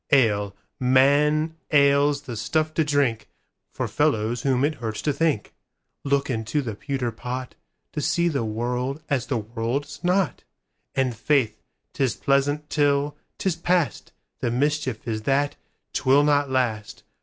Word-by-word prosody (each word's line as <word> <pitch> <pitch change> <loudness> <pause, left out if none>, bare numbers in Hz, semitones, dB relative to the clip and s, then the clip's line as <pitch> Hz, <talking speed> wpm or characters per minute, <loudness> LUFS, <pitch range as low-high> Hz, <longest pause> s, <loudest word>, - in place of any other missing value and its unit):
Ale, 105 -7 +3 0.2
man, 145 +5 +3
ale's 140 -1 +4
the 125 -5 -6
stuff 155 +8 0
to 160 - +2
drinkFor 140 -7 -2
fellows 110 +2 +1
whom 135 0 +2
it 155 - 0
hurts 110 -2 -3
to 150 - +1
think:Look 140 -1 -2
into 115 +3 -1
the 115 -4 -4
pewter 135 +1 -3
potTo 125 +2 -6 0.4
see 170 +3 +1
the 140 -7 0
world 125 +6 -2
as 130 -4 0
the 130 - 0
world's 115 +6 -4
not. 180 0 +1 0.5
And 130 -3 +1
faith, 120 -2 +1 0.3
'tis 130 -4 0
pleasant 145 +2 +1
till 145 -1 +2 0.2
'tis 190 -4 0
past:The 170 -8 -2
mischief 130 -2 -1
is 110 -1 -2
that 140 +5 +1 0.4
'twill 135 +2 +4
not 145 -1 +2
last. 110 -6 -1
135 Hz, 130 wpm, -24 LUFS, 120-145 Hz, 0.5 s, ale's